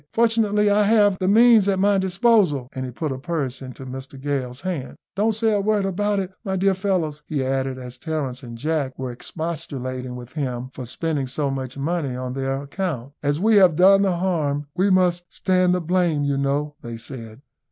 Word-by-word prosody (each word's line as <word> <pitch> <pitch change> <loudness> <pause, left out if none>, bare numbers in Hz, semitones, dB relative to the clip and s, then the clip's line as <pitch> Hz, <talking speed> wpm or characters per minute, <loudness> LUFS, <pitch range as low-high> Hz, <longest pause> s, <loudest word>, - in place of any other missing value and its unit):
Fortunately, 225 -2 +3
I 205 +1 +4
have 205 -2 +4
the 185 - 0
means 225 0 +6
at 195 -1 +2
my 200 +1 +3
disposal;" 190 - +2
and 130 0 -4
he 125 - -6
put 150 +4 -3
a 130 - -4
purse 140 -4 -3
into 130 0 -9
Mr 130 +1 -8
Gale's 135 -2 -3
hand. 175 -8 -4 0.2
"Don't 215 +2 +1
say 220 +1 +2
a 205 - +2
word 210 -1 +1
about 205 +2 0
it, 190 -1 -2
my 190 -3 -2
dear 195 +1 +3
fellows," 180 -6 -1
he 140 -4 -1
added, 135 0 -1
as 125 -1 -9
Terence 145 -5 -3
and 120 -3 -9
Jack 145 -1 -2
were 130 -1 -4
expostulating 130 -4 -5
with 125 -1 -9
him 130 -4 -4
for 125 - -7
spending 145 +1 -2
so 140 +2 -1
much 135 -1 -5
money 145 -2 -2
on 125 0 -4
their 135 +1 -2
account. 140 -4 -4
"As 145 +1 0
we 215 +2 +4
have 185 -5 +6
done 195 +3 +6
the 190 -3 +1
harm, 155 -6 0
we 190 +2 +2
must 180 -2 +2
stand 185 -1 +2
the 180 - -1
blame, 170 -3 +1
you 140 -1 +1
know," 145 +2 0
they 115 -1 -7
said. 115 0 -9
155 Hz, 200 wpm, -23 LUFS, 130-190 Hz, 0.2 s, means